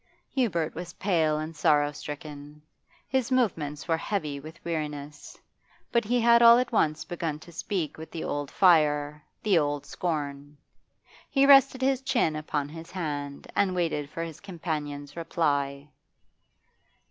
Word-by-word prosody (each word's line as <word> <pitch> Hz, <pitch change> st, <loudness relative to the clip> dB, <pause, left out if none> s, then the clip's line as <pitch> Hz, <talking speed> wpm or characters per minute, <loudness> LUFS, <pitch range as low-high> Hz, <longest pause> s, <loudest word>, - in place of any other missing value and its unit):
Hubert 180 Hz, -, 0 dB
was 175 Hz, -1 st, -7 dB
pale 160 Hz, -6 st, +1 dB
and 155 Hz, +1 st, -5 dB
sorrow 145 Hz, 0 st, +3 dB
stricken; 150 Hz, 0 st, -9 dB, 0.4 s
his 260 Hz, -2 st, 0 dB
movements 165 Hz, -, 0 dB
were 165 Hz, -1 st, +2 dB
heavy 155 Hz, -6 st, -3 dB
with 155 Hz, +4 st, -11 dB
weariness, 150 Hz, -3 st, -5 dB, 0.5 s
but 235 Hz, 0 st, +3 dB
he 245 Hz, +3 st, +2 dB
had 235 Hz, 0 st, +6 dB
all 235 Hz, 0 st, +9 dB
at 250 Hz, 0 st, 0 dB
once 155 Hz, -8 st, +1 dB
begun 165 Hz, -3 st, -3 dB
to 165 Hz, +3 st, -14 dB
speak 170 Hz, -2 st, -3 dB
with 160 Hz, -, -8 dB
the 165 Hz, -, -5 dB
old 145 Hz, -1 st, -3 dB
fire, 150 Hz, -4 st, +3 dB, 0.2 s
the 195 Hz, -5 st, +4 dB
old 145 Hz, -1 st, -1 dB
scorn. 145 Hz, -4 st, -4 dB, 0.7 s
He 275 Hz, -1 st, +4 dB
rested 275 Hz, -2 st, +6 dB
his 265 Hz, -1 st, +2 dB
chin 240 Hz, -, +1 dB
upon 150 Hz, -2 st, -2 dB
his 165 Hz, +2 st, -10 dB
hand 145 Hz, -5 st, -4 dB
and 190 Hz, -2 st, +2 dB
waited 155 Hz, -5 st, -1 dB
for 165 Hz, -, -4 dB
his 165 Hz, -3 st, -7 dB
companion's 150 Hz, -6 st, -5 dB
reply. 145 Hz, -4 st, -1 dB
160 Hz, 145 wpm, -27 LUFS, 145-190 Hz, 0.7 s, all